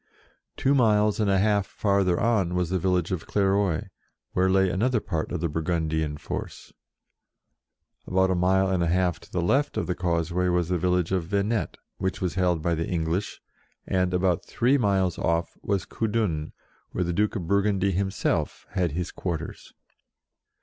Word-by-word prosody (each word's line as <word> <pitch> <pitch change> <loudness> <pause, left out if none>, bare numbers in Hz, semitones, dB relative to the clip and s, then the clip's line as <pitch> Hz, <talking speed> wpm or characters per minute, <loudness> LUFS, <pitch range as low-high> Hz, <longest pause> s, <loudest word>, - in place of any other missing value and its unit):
Two 135 - +2
miles 105 -5 +3
and 105 -2 +2
a 95 - +3
half 100 0 +2
farther 100 -4 +1
on 105 -7 +1
was 90 -1 0
the 95 - +1
village 90 -1 0
of 90 -3 -3
Clairoix, 100 -4 +1 0.4
where 95 +1 +2
lay 95 0 +4
another 110 +6 +1
part 85 -7 -3
of 90 - -3
the 85 - +1
Burgundian 80 -1 -1
force. - - -7 1.3
About 95 +1 +2
a - - +3
mile 95 +2 +2
and 95 -2 0
a 85 - +1
half 90 0 +1
to - - -18
the 90 - -1
left 140 +11 +1
of - - 0
the 90 - -1
causeway 85 0 0
was 90 -1 +1
the 90 -1 0
village 90 0 +1
of 95 -3 0
Venette, 105 +3 -1 0.2
which 95 0 -2
was 90 -2 -1
held 90 -4 +1
by 85 - +1
the 80 0 -2
English, 85 +3 -2 0.4
and, 90 -1 +1
about 90 -1 +1
three 125 +4 +1
miles 95 -5 +1
oft", 85 0 0
was 100 -2 -1
Coudun, 105 -9 -1 0.4
where 90 - 0
the 85 0 -2
Duke 105 +5 +1
of 90 -5 -3
Burgundy 100 +1 +2
himself 95 +1 -1
had 90 -6 0
his 90 +1 -3
quarters. 85 -3 -5
90 Hz, 170 wpm, -26 LUFS, 85-100 Hz, 1.3 s, lay